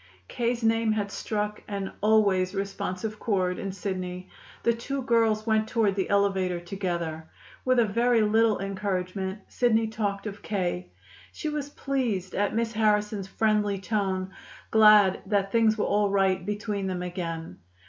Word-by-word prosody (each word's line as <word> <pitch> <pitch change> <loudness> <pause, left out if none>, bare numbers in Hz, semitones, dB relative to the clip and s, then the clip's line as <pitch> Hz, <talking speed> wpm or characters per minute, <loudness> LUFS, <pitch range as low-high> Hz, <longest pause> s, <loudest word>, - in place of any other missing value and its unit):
K.'s 240 0 -1
name 225 -1 +2
had 205 -2 -2
struck 210 0 -3
an 200 -2 -4
always 200 -3 +3
responsive 195 +1 -3
chord 185 -4 0
in 195 - -3
Sidney. 185 -1 -5 0.3
The 235 - +3
two 265 +4 -4
girls 225 -2 +2
went 220 -1 +2
toward 220 -3 +2
the 190 -1 -2
elevator 195 -3 +1
together. 170 -3 -4 0.4
With 255 0 +3
a 235 - +5
very 235 +2 +2
little 220 0 +3
encouragement, 190 0 -3
Sidney 225 -2 +2
talked 205 -2 -3
of 205 -1 -6
K. 175 - -2 0.4
She 310 - -4
was 295 -1 -3
pleased 245 -11 -2
at 205 +1 0
Miss 230 0 0
Harrison's 210 -2 +1
friendly 210 -1 +1
tone, 190 -1 -2 0.4
glad 210 -3 +6
that 195 -1 +1
things 225 -1 +3
were - - 0
all 205 0 +2
right 190 -2 +2
between 205 0 -3
them 180 -1 -3
again. 170 -2 -5
205 Hz, 150 wpm, -27 LUFS, 190-220 Hz, 0.4 s, glad